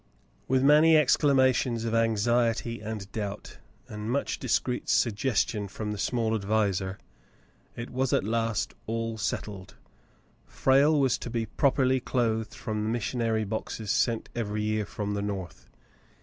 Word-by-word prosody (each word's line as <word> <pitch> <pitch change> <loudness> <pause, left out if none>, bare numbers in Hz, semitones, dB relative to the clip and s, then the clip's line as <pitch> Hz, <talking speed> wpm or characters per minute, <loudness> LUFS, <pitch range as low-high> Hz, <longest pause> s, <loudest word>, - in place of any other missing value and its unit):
With 130 0 +2
many 155 +3 +6
exclamations 130 -5 +3
of 115 - -2
anxiety 115 +1 +1
and 105 -2 -6
doubt, 105 -2 -6 0.3
and 105 +1 -6
much 140 +3 -1
discreet 125 0 -1
suggestion 110 -2 +1
from 105 +2 -5
the 105 - -5
small 115 -1 0
adviser, 100 -3 0 0.8
it 120 +1 -7
was 130 0 0
at - - +2
last 115 +1 -1 0.4
settled. 100 -2 -4 0.7
Frale 140 +3 +3
was 135 -3 +2
to - - -6
be 115 -1 -2
properly 130 +3 +2
clothed 115 -3 -1
from 110 -2 -3
the 110 - -1
missionary 115 -1 -1
boxes 110 0 -4
sent 115 0 +1
every 105 -3 -2
year 105 -1 -1
from 105 0 -4
the 100 - -2
North. 95 -4 -6
115 Hz, 135 wpm, -28 LUFS, 105-125 Hz, 0.8 s, many